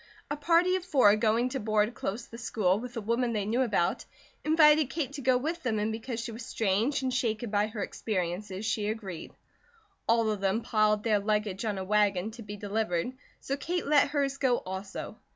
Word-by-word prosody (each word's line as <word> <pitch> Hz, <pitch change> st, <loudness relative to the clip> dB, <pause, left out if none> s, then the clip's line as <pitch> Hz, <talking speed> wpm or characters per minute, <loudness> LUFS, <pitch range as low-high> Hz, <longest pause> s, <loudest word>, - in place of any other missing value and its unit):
A -, -, +1 dB
party 340 Hz, +5 st, +3 dB
of 375 Hz, -, -2 dB
four, 260 Hz, -, +5 dB
going 225 Hz, +3 st, +2 dB
to 270 Hz, +1 st, -3 dB
board 215 Hz, +1 st, +1 dB
close 230 Hz, +1 st, -4 dB
the 230 Hz, -, -11 dB
school, 205 Hz, -5 st, +1 dB
with 245 Hz, +1 st, -7 dB
a -, -, -2 dB
woman 235 Hz, +3 st, 0 dB
they 210 Hz, -2 st, -1 dB
knew 230 Hz, +5 st, +1 dB
about, 205 Hz, -8 st, +1 dB, 0.4 s
invited 305 Hz, -2 st, +5 dB
Kate 285 Hz, -3 st, -3 dB
to 285 Hz, -, -6 dB
go 255 Hz, 0 st, +3 dB
with 320 Hz, +6 st, -3 dB
them 240 Hz, -6 st, -1 dB
and 210 Hz, +1 st, 0 dB
because 225 Hz, +2 st, -4 dB
she 235 Hz, 0 st, -4 dB
was 230 Hz, +2 st, -7 dB
strange 225 Hz, +6 st, 0 dB
and 260 Hz, -1 st, 0 dB
shaken 230 Hz, -2 st, -1 dB
by 205 Hz, 0 st, +2 dB
her 215 Hz, -2 st, -4 dB
experiences 190 Hz, 0 st, -3 dB
she 215 Hz, -1 st, 0 dB
agreed. 200 Hz, -6 st, -6 dB, 0.8 s
All 230 Hz, -1 st, +3 dB
of 205 Hz, -2 st, -3 dB
them 200 Hz, +4 st, +1 dB
piled 215 Hz, -1 st, +2 dB
their 215 Hz, -3 st, +3 dB
luggage 210 Hz, 0 st, -1 dB
on 210 Hz, -2 st, -1 dB
a 190 Hz, -, -3 dB
wagon 205 Hz, 0 st, +1 dB
to 230 Hz, +2 st, -10 dB
be 205 Hz, -1 st, -7 dB
delivered, 205 Hz, 0 st, -1 dB, 0.3 s
so 275 Hz, -, -2 dB
Kate 340 Hz, +6 st, -3 dB
let 295 Hz, 0 st, +4 dB
hers 280 Hz, -2 st, 0 dB
go 250 Hz, -3 st, +3 dB
also. 190 Hz, +1 st, -6 dB
225 Hz, 205 wpm, -29 LUFS, 205-255 Hz, 0.8 s, four